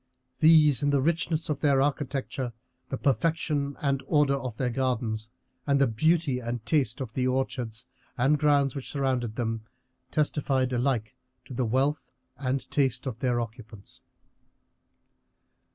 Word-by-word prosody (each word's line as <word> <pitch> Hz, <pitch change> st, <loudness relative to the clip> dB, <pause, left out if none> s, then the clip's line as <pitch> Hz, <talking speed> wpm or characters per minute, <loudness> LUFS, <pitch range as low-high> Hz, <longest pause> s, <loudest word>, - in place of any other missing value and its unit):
These 155 Hz, -5 st, +6 dB
in 145 Hz, -, +2 dB
the 140 Hz, -1 st, +3 dB
richness 165 Hz, +2 st, 0 dB
of 150 Hz, -2 st, -2 dB
their 140 Hz, -2 st, +3 dB
architecture, 135 Hz, -3 st, -1 dB, 0.4 s
the 135 Hz, -, -2 dB
perfection 145 Hz, +1 st, 0 dB
and 140 Hz, -1 st, +1 dB
order 145 Hz, -3 st, +3 dB
of 130 Hz, -5 st, -4 dB
their 125 Hz, -2 st, 0 dB
gardens, 115 Hz, -3 st, -1 dB, 0.4 s
and 140 Hz, -1 st, +3 dB
the 140 Hz, -, +5 dB
beauty 145 Hz, +3 st, +1 dB
and 120 Hz, -1 st, -5 dB
taste 140 Hz, -5 st, +1 dB
of 115 Hz, -4 st, -5 dB
the 130 Hz, -1 st, 0 dB
orchards 125 Hz, -3 st, -2 dB, 0.3 s
and 140 Hz, +4 st, +3 dB
grounds 145 Hz, -3 st, +3 dB
which 135 Hz, -, -6 dB
surrounded 130 Hz, -5 st, -1 dB
them, 115 Hz, -2 st, -2 dB, 0.5 s
testified 135 Hz, -4 st, 0 dB
alike 120 Hz, -3 st, 0 dB, 0.3 s
to -, -, -9 dB
the 125 Hz, 0 st, 0 dB
wealth 135 Hz, +4 st, 0 dB, 0.2 s
and 135 Hz, 0 st, -2 dB
taste 130 Hz, -3 st, +1 dB
of 120 Hz, -4 st, -4 dB
their 125 Hz, -2 st, +1 dB
occupants. 110 Hz, -3 st, -8 dB
135 Hz, 140 wpm, -27 LUFS, 120-145 Hz, 0.5 s, These